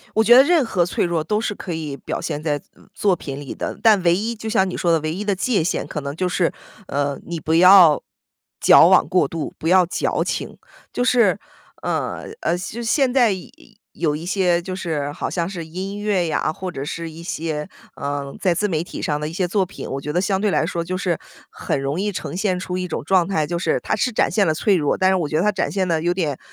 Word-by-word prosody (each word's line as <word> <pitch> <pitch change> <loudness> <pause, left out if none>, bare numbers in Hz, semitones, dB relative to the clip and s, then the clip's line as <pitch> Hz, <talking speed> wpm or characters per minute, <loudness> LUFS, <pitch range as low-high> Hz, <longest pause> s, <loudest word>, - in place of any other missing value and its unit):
我 220 - +4
觉 240 +2 +7
得 265 - +9
任 325 -1 +3
何 185 -6 +1
脆 175 - -1
弱 170 -3 -1
都 210 0 0
是 220 -2 -2
可 185 - -6
以 155 -4 -4
表 - - -5
现 150 - -4
在， 145 -2 -1 0.2
嗯， - - -21
作 195 -3 +2
品 140 -3 -7
里 140 - -7
的， - - -5
但 215 -4 +5
唯 170 -1 +4
一 220 +5 -2
就 220 0 -7
像 190 -4 +2
你 - - -4
说 170 -1 +1
的 165 - +3
唯 155 +1 -2
一 205 +4 -4
的 205 - +1
界 195 -2 0
限， - - -1
可 150 - -5
能 140 0 -5
就 180 +3 -1
是， 180 -1 0 0.4
呃， 140 0 -1
你 170 -1 -5
不 160 - -1
要 180 -3 +7 0.6
矫 - - +7
枉 - - +4
过 180 - +3
度， 165 -3 -5
不 160 - -3
要 185 -1 +5
矫 - - -1
情。 - - -4 0.3
就 - - -1
是 235 -7 +3 0.4
呃 - - -2 0.2
呃 175 - 0
就 210 +6 -6
现 250 +2 +2
在 245 -5 +4
有 185 -2 -5 0.5
有 150 -3 0
一 160 - -7
些 180 -2 +1
就 185 +1 -5
是 155 -6 -3
好 - - -4
像 170 -2 -2
是 170 -4 -6
音 190 +5 -5
乐 205 -4 0
呀， 155 - 0
或 185 +3 -6
者 135 - -5
是 165 +2 -5
一 160 +1 -11
些， 155 -2 -4 0.3
呃， 140 -1 -4
在 180 -2 +2
自 210 +5 0
媒 165 -6 -1
体 175 - -8
上 150 -1 -1
的 150 - -3
一 - - -8
些 185 0 0
作 190 +1 0
品， - - -9
我 135 - -3
觉 150 - -5
得 175 - +2
相 190 0 0
对 210 0 +1
来 - - +1
说 170 - -2
就 180 +2 -3
是 180 -3 -1 0.3
很 - - -3
容 140 +5 -2
易 205 +1 0
呈 190 - -5
现 185 -1 0
出 180 0 -4
一 180 0 -3
种 160 - -4
状 185 +1 +3
态 160 -6 0
就 170 +3 -2
是 175 - 0
它 - - -1
是 220 +4 0
展 225 - +1
现 205 -3 +2
了 160 - +2
脆 195 +5 +2
弱， 150 -4 +1
但 185 0 +3
是 190 - +3
我 170 -5 -1
觉 155 - -2
得 165 - +2
它 210 - +2
展 195 - -1
现 190 -2 0
得 165 -2 +1
有 175 +2 0
点 155 -7 -2
180 Hz, 275 characters per minute, -21 LUFS, 160-195 Hz, 0.6 s, 得